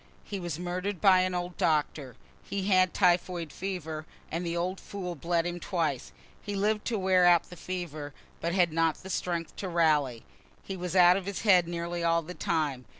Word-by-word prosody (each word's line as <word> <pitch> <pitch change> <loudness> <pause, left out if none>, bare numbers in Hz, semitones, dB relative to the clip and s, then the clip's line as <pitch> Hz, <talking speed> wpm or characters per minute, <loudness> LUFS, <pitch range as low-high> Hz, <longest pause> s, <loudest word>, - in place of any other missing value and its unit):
He 200 - -5
was 175 -4 -4
murder'd 180 +2 -3
by 190 0 +6
an 185 0 0
old 175 0 -4
doctor. 150 -4 0 0.3
He 200 0 -3
had 185 -2 +4
typhoid 175 -3 +1
fever, 160 -5 -5 0.2
and 165 +2 -2
the 170 0 -2
old 185 +2 -2
fool 185 -3 -6
bled 170 +1 -1
him 175 0 -3
twice. 160 -8 -2 0.3
He 205 - -5
lived 210 +2 0
to 230 - -1
wear 185 -2 +3
out 175 -1 +4
the - - -8
fever, 165 -4 -5 0.3
but 170 - -1
had 175 -4 +3
not 165 -1 +2
strength 170 -3 -2
to 190 - -4
rally. 150 -8 +2 0.4
He 195 - -5
was 180 0 -4
out 180 0 +7
of 195 -1 -5
his 200 - -3
head 185 -5 +5
nearly 170 0 -3
all 170 0 +2
the 175 +3 -8
time. 150 -8 -1
175 Hz, 190 wpm, -29 LUFS, 165-185 Hz, 0.4 s, out